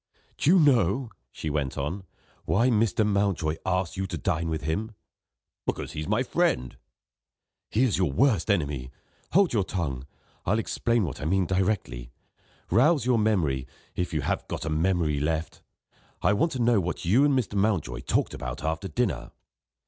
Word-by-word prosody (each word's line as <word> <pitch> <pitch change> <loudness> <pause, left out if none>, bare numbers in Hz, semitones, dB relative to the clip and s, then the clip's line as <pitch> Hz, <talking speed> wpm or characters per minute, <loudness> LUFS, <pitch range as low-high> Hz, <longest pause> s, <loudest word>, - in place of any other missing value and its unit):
"Do - - +2
you 190 - +7
know," 125 - +3 0.2
she 80 - -4
went 70 -3 -2
on, 85 +8 -3 0.4
"why 115 +11 +3
Mr. 110 0 +2
Mountjoy 100 -6 0
asked 90 -1 0
you 95 0 -2
to 90 -3 -4
dine 80 +3 -1
with 80 -2 -3
him?" 105 +9 -2 0.7
"Because - - -2
he's 75 0 -5
my - - +2
friend." 65 0 0 0.9
"He 115 - +2
is 120 -7 +1
your 90 -7 +2
worst 115 - +2
enemy. 70 -9 0 0.4
Hold 190 -2 +4
your 105 -4 +2
tongue! 70 -9 -3 0.4
I'll 105 +4 +1
explain 115 0 0
what 75 -9 -4
I - - -3
mean 95 +3 +2
directly. 90 - -1 0.6
Rouse 135 - +4
your 125 -2 +3
memory, 80 -12 +1 0.3
if 90 0 -2
you 75 -3 -1
have - - -2
got - - -4
a 80 - -2
memory 80 -2 +1
left. 80 +2 -2 0.6
I 100 - +4
want 160 +11 +1
to 130 - -4
know 120 -2 +4
what 90 +1 -4
you 110 +11 +4
and 145 -2 +3
Mr. 120 -5 -1
Mountjoy 95 - 0
talked 65 - 0
about 65 +3 -6
after 80 +5 -2
dinner." 80 - -1
95 Hz, 170 wpm, -27 LUFS, 75-110 Hz, 0.9 s, you